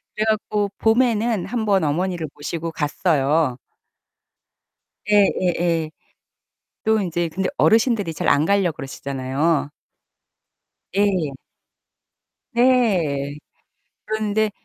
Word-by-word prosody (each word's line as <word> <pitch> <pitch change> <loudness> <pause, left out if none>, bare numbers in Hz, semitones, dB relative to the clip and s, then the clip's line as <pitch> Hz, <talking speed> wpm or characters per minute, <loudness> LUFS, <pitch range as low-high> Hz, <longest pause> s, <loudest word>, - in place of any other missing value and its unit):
그래 215 - 0
갖고 210 -1 0
봄에는 225 -3 +2
한번 210 -4 +1
어머니를 165 +2 -1
모시고 165 +3 -4
갔어요 150 -3 +1 1.5
예. - - +5 0.3
예. 180 -2 +2
예. 165 -2 0 0.9
또 220 0 +3
인제 175 -3 -1
근데 185 +3 -2
어르신들이 220 -6 +3
잘 - - -3
안 145 +1 +4
가려고 195 -2 +1
그러시잖아요 140 +3 -2 1.3
예. 190 -7 +1 1.2
네. 185 - +2 0.7
그런데 215 0 0
180 Hz, 195 characters per minute, -21 LUFS, 155-215 Hz, 1.5 s, 예